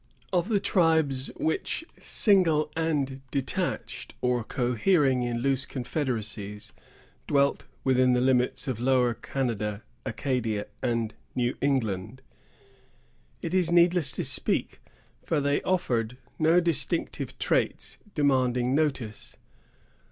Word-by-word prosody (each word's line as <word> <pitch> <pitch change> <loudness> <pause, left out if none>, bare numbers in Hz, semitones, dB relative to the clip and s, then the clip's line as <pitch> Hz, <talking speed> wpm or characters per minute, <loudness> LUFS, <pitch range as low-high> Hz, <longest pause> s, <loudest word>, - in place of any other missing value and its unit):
Of 180 +3 +1
the 210 -3 +3
tribes 160 -9 +2
which, 160 - -1 0.2
single 165 -8 +3
and 145 -5 -1
detached, 135 -1 -3
or 125 -1 +1
cohering 130 - +2
in 120 -1 -2
loose 135 -1 +1
confederacies, 110 -6 -4 0.5
dwelt 140 -1 +2 0.2
within 130 -1 +4
the 125 - +3
limits 125 0 +1
of 125 -4 -2
Lower 125 -1 +3
Canada, 110 -5 -3 0.2
Acadia, 115 -3 -2 0.2
and 115 -3 -1 0.2
New 120 0 0
England, 120 -3 -1 1.2
it 170 0 -3
is 180 -3 +2
needless 175 -4 +4
to - - -2
speak; - - 0 0.4
for 160 - 0
they 145 0 +1
offered 125 -10 0 0.2
no 165 +2 +5
distinctive 170 -1 -1
traits - - -1 0.2
demanding 130 -3 +2
notice. 135 -8 -1
130 Hz, 105 wpm, -27 LUFS, 120-155 Hz, 1.2 s, no